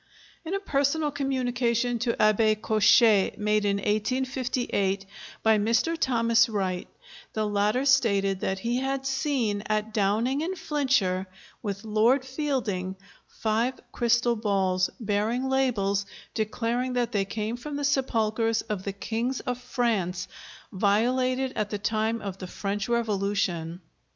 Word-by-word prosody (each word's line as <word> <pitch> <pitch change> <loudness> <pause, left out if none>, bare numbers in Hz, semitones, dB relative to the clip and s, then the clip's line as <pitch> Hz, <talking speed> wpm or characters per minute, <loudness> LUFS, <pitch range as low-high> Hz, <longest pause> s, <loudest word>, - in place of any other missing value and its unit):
In 340 +4 -3
a - - 0
personal 295 -3 0
communication 245 -3 0
to 235 0 0
Abbé 215 0 +3
Cochet 215 -1 +4
made 210 0 +1
in 200 -1 +2
1858 215 -2 -1 0.4
by 220 -1 +4
Mr. 230 +10 +1
Thomas 230 -5 +3
Wright, 190 -4 -2 0.5
the 215 -1 0
latter 210 +5 +1
stated 200 -8 +3
that 190 - -1
he 235 +5 -1
had 270 +1 -2
seen 265 -6 0
at 215 0 -1
Downing 220 +7 +1
in 360 +4 -2
Flintshire 265 - 0 0.3
with 200 -2 -4
Lord 225 +5 +2
Fielding 255 -10 -2 0.3
five 230 +4 -1
crystal 235 0 +2
balls, 195 -4 +1
bearing 220 +4 0
labels 210 -7 +1 0.3
declaring 235 +3 -1
that 245 -1 0
they 205 -4 +1
came 215 +3 -3
from 290 +4 -6
the 290 - -3
sepulchres 225 -5 +1
of 210 -3 -4
the 195 +1 -4
kings 230 +6 -2
of 250 0 -3
France 225 -8 -1 0.4
violated 255 +6 +1
at 210 -1 -1
the 210 - -2
time 220 +2 -1
of 195 -1 -5
the 185 - -6
French 200 +3 -3
Revolution. 200 -7 -1
225 Hz, 130 wpm, -27 LUFS, 205-255 Hz, 0.5 s, Cochet